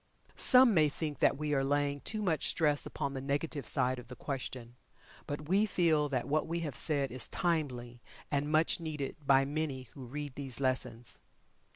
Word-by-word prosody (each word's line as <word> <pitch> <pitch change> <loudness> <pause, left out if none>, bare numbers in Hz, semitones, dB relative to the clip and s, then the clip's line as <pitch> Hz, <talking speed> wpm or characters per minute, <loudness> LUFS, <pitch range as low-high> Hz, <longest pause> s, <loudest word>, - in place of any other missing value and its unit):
Some 255 -2 +7
may 155 -4 +4
think 150 -1 -5
that - - +3
we 150 0 -2
are 135 -1 +2
laying 145 +1 0
too 215 -1 -3
much 160 -7 +1
stress 150 -3 +1
upon 140 - -4
the 135 - -4
negative 145 +2 -3
side 130 -2 +1
of 125 - -12
the 125 - -9
question, 125 -3 -6 0.5
but 145 +1 -5
we 200 +5 +3
feel 160 -6 +2
that 130 -2 -2
what 155 +3 0
we 170 +1 -2
have 150 -6 -4
said 140 -2 +1
is 125 -1 -1
timely, 125 -8 -2 0.3
and 145 +1 -1
much 160 +2 +2
needed 150 -4 -4
by 135 -1 +4
many 145 -2 -3
who 130 -3 -10
read 145 +2 -6
these 135 -3 -3
lessons. 130 -3 -1
145 Hz, 185 wpm, -32 LUFS, 135-155 Hz, 0.5 s, Some